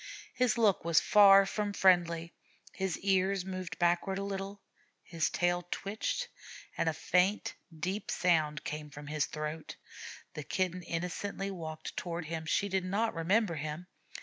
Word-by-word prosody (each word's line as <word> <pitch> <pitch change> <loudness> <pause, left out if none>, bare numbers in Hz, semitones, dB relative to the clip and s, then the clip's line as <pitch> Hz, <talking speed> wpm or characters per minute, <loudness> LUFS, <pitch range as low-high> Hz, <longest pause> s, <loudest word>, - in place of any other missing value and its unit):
His 245 -3 +2
look 215 -5 +3
was 170 -1 +4
far 195 -2 +7
from 205 +1 -2
friendly; 170 -3 +3 0.4
his 190 -2 -2
ears 195 -1 +2
moved 185 -2 -5
backward 175 +2 +1
a 200 - -2
little, 200 0 -4 0.4
his 165 -3 -1
tail 175 0 0
twitched, 215 - -2 0.5
and 165 - +1
a - - +1
faint, 180 +6 +1 0.3
deep 190 +5 -3
sound 155 -5 +1
came 150 0 -5
from 145 0 -10
his 150 0 -1
throat. 155 +1 -5 0.6
The 150 - -5
Kitten 180 +4 -1
innocently 180 +4 -3
walked 160 -4 -6
toward 170 -1 -4
him. 160 0 -5
She 200 - +1
did 190 -1 0
not 210 +5 0
remember 190 +4 +1
him. 155 +2 -5
180 Hz, 150 wpm, -32 LUFS, 165-195 Hz, 0.6 s, far